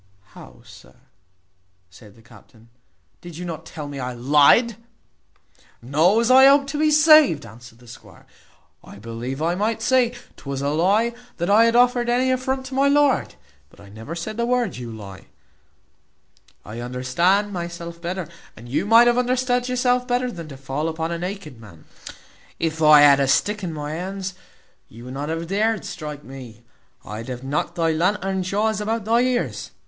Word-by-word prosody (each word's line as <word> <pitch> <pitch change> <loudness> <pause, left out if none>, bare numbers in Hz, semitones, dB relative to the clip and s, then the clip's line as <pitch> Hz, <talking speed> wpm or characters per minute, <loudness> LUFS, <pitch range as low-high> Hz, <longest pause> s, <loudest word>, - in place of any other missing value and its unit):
"How, - - -15
sir," - - -16 1.0
said 100 +3 -17
the 115 - -20
captain, 115 0 -20 0.5
"did 175 -2 -11
you 180 - -6
not 160 -2 -7
tell 150 -2 -8
me 140 -1 -7
I 125 -1 -4
lyed?" 145 - +3 1.0
"No, 155 - +2
as 235 +2 +1
I 265 +1 +8
hope 280 0 +5
to 295 - -4
be 310 0 +3
saved," 305 - +5
answered 115 +2 -14
the 120 0 -19
squire, 115 - -15 0.3
" - - -39
I - - -13
believe 115 +6 -6
I 170 +1 +1
might 215 +5 -1
say, 250 -1 +2 0.2
'Twas 140 -1 -6
a 140 - 0
lie 200 +10 +1 0.2
that 175 +3 -1
I 220 +3 +6
had 230 0 +1
offered 245 0 +3
any 255 +2 +1
affront 260 +1 -2
to 260 - -9
my 275 +1 +2
lord 285 -1 +2 0.3
but - - -22
I 100 0 -15
never 110 +10 -9
said 215 +6 -6
the 235 - 0
word, 250 -1 0
`you 120 -2 -8
lie.' 95 -3 -11 1.4
I 110 +2 -8
understand 150 +12 0
myself 170 -1 -7
better, 180 -1 -4 0.3
and 115 +2 -12
you 150 +10 -2
might 230 +2 +7
have 240 +1 +3
understood 250 0 0
yourself 250 0 0
better 250 0 -1
than 170 -6 -9
to 140 -3 -10
fall 135 +4 -3
upon 160 +1 -4
a 170 - -4
naked 175 - -7
man. 85 -8 -15 0.7
If 165 -1 -3
I 150 -1 +7
had 140 -1 +6
a 135 - +1
stick 210 +9 0
in 175 - -3
my 150 -1 -6
hand, 190 +3 -5 0.6
you 120 +2 -13
would 125 - -8
not 145 +3 -5
have 165 +1 -3
dared 210 +4 -1
strike 150 -2 -7
me. 125 -4 -12 0.4
I'd 110 +3 -7
have 125 -1 -7
knocked 150 +5 -3
thy 165 -2 +1
lantern 190 +3 -1
jaws 210 +3 -1
about 220 0 -3
thy 230 +2 +2
ears. 250 -1 -2
170 Hz, 180 wpm, -22 LUFS, -, 1.4 s, I